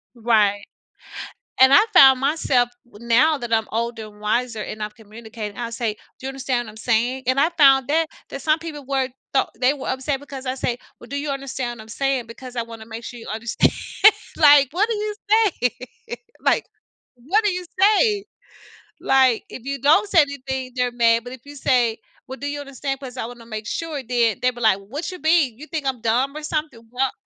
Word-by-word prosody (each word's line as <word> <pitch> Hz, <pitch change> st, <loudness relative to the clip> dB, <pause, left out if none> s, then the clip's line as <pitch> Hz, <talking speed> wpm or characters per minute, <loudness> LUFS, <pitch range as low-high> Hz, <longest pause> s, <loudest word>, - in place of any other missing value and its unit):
Right. 215 Hz, -3 st, +2 dB, 1.0 s
And 265 Hz, +1 st, +8 dB
I 285 Hz, -, +8 dB
found 270 Hz, -6 st, +8 dB
myself, 270 Hz, -4 st, +2 dB, 0.2 s
now 240 Hz, +7 st, +2 dB
that 240 Hz, -1 st, -6 dB
I'm 220 Hz, -1 st, +2 dB
older 230 Hz, 0 st, -3 dB
and 210 Hz, 0 st, -17 dB
wiser, 225 Hz, +1 st, -1 dB
and 215 Hz, +1 st, -6 dB
I've 210 Hz, 0 st, -5 dB
communicated, 220 Hz, -1 st, -9 dB
I'll 235 Hz, -1 st, -4 dB
say, 230 Hz, -3 st, -2 dB, 0.2 s
"Do 260 Hz, -, -10 dB
you -, -, -2 dB
understand 260 Hz, -3 st, -2 dB
what -, -, -9 dB
I'm 215 Hz, -, -15 dB
saying," 245 Hz, +3 st, 0 dB
and 260 Hz, -, +2 dB
I 305 Hz, +4 st, +4 dB
found 270 Hz, -3 st, +5 dB
that 320 Hz, +1 st, +2 dB, 0.2 s
that 275 Hz, -, -7 dB
some 310 Hz, 0 st, +2 dB
people 300 Hz, -4 st, -8 dB
were 270 Hz, -1 st, 0 dB, 0.2 s
tho 270 Hz, -, +3 dB
they 260 Hz, +3 st, +3 dB
were 275 Hz, -, -7 dB
upset 265 Hz, +1 st, -2 dB
because 275 Hz, -2 st, -9 dB
I 255 Hz, 0 st, -2 dB
say, 245 Hz, -2 st, -2 dB, 0.2 s
"Well, 240 Hz, -, -13 dB
do 280 Hz, -, -3 dB
you 290 Hz, +1 st, -3 dB
understand 260 Hz, -3 st, -4 dB
what -, -, -9 dB
I'm 220 Hz, -, -17 dB
saying, 265 Hz, -1 st, -1 dB
because 250 Hz, +2 st, -10 dB
I 235 Hz, -, 0 dB
want 230 Hz, -1 st, -9 dB
to 220 Hz, -, -11 dB
make 230 Hz, +1 st, -8 dB
sure 240 Hz, +1 st, -8 dB
you 230 Hz, -, -11 dB
understand," 225 Hz, +1 st, +1 dB, 0.6 s
like, 290 Hz, -3 st, +7 dB
what 385 Hz, +7 st, +1 dB
do 460 Hz, -, -1 dB
you 420 Hz, 0 st, -3 dB
say, 415 Hz, -, +2 dB, 0.7 s
like, -, -, +2 dB, 0.5 s
what 320 Hz, -, 0 dB
do 415 Hz, -, +2 dB
you 360 Hz, 0 st, -4 dB
say? 415 Hz, 0 st, +4 dB, 0.7 s
Like, 260 Hz, -4 st, +3 dB
if 245 Hz, -, -9 dB
you 275 Hz, 0 st, -4 dB
don't 310 Hz, +8 st, +4 dB
say 340 Hz, -, +6 dB
anything, 265 Hz, -2 st, -4 dB
they're 250 Hz, -1 st, 0 dB
mad, 230 Hz, -1 st, +3 dB
but 245 Hz, -, -9 dB
if 255 Hz, -, -11 dB
you 290 Hz, 0 st, -11 dB
say, 245 Hz, -4 st, +1 dB, 0.3 s
"Well, 265 Hz, +1 st, -7 dB
do 285 Hz, -, -4 dB
you 290 Hz, 0 st, -4 dB
understand, 275 Hz, -1 st, -5 dB
'cause 260 Hz, -2 st, -9 dB
I 225 Hz, -, -3 dB
wanna 240 Hz, 0 st, -10 dB
make 215 Hz, -2 st, -6 dB
sure," 310 Hz, -1 st, -4 dB
then, 235 Hz, -3 st, +1 dB
they 250 Hz, 0 st, +2 dB
be 240 Hz, -, -12 dB
like, 220 Hz, -4 st, +3 dB
"What's 270 Hz, -, -6 dB
your 365 Hz, -, -10 dB
beef? 315 Hz, -6 st, +3 dB
You 300 Hz, +4 st, -11 dB
think 315 Hz, -4 st, -4 dB
I'm 260 Hz, -4 st, -2 dB
dumb 250 Hz, +5 st, 0 dB
or 305 Hz, -, -7 dB
something?" 300 Hz, -5 st, -3 dB
"What 255 Hz, +2 st, 0 dB
260 Hz, 215 wpm, -22 LUFS, 230-285 Hz, 1.0 s, And